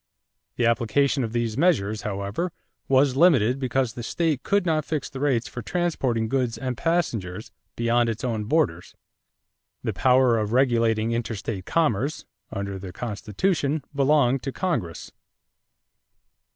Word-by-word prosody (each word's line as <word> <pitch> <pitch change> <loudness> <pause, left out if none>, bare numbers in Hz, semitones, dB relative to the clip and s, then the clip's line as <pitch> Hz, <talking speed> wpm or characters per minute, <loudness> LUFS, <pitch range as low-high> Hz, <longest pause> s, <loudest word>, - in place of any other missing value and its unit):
The 120 - +1
application 120 +4 +2
of 115 - -3
these 115 -2 -1
measures, 110 - +2
however, 100 - -3 0.4
was 135 0 +3
limited 135 -6 +4
because 130 -2 0
the 120 - -7
state 155 +3 -1
could 200 -2 +1
not 155 -3 +1
fix 150 -1 -3
the 135 - -7
rates 130 -5 +1
for 125 - -7
transporting 130 - -1
goods 125 -2 -1
and 130 +1 -3
passengers 115 - -2 0.2
beyond 120 0 +2
its 115 0 -4
own 115 -4 -1
borders. 95 - 0 0.9
The - - -1
power 125 -2 +4
of 105 +1 -2
regulating 115 -3 +2
interstate 115 -4 -3
commerce, 145 -4 0 0.3
under 100 -1 -4
the 95 -1 -7
Constitution, 135 - -1
belonged 135 -2 +3
to 135 - -4
Congress. 120 - -3
120 Hz, 135 wpm, -25 LUFS, 110-140 Hz, 0.9 s, limited